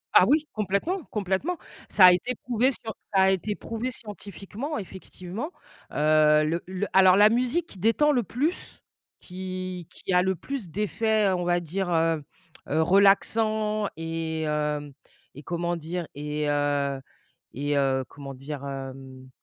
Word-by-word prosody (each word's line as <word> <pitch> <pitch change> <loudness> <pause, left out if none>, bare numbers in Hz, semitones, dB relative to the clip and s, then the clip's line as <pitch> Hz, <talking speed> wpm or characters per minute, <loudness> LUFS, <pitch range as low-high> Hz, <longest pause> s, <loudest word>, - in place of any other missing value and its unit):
Ah - - +8
oui, 300 +3 +3
complètement 215 - -1
complètement. 210 - -2 0.3
Ça 185 - +7
a 180 - +10
été 245 +8 -1
prouvé 245 +3 +1
scien 225 -3 -5 0.2
ça 190 - +5
a 190 - +5
été 205 +2 -1
prouvé 230 +3 -4
scientifiquement, 210 - -7
effectivement 190 - -7 0.4
heu. 155 0 +4
Le 165 +3 -1
le 190 +2 -2
alors, 190 -1 +7
la 210 +1 +7
musique 250 +8 +1
qui 195 - -12
détend 230 - +3
le 250 -4 +2
plus, 285 - -3 0.4
qui 185 -1 -6
qui 185 - -5
a 180 - +5
le 190 0 +1
plus 250 - -6
d'effets, 215 +3 +1
heu, - - +2
on 175 -1 -2
va 175 0 +2
dire, 180 +3 -3
heu, 165 -2 +1 0.5
heu, 155 +2 +2
relaxant, 210 +3 +3
et 165 -1 -3
hem, 150 -1 -2 0.4
et 145 - -10
comment 170 +2 -2
dire, 170 +1 -4
et 150 +1 -3
heu 145 -1 0 0.5
et 145 +2 -1
heu, 135 -1 +2
comment 140 -1 -9
dire, 140 +1 -7
hem, 135 -1 -8
185 Hz, 155 wpm, -26 LUFS, 150-215 Hz, 0.5 s, a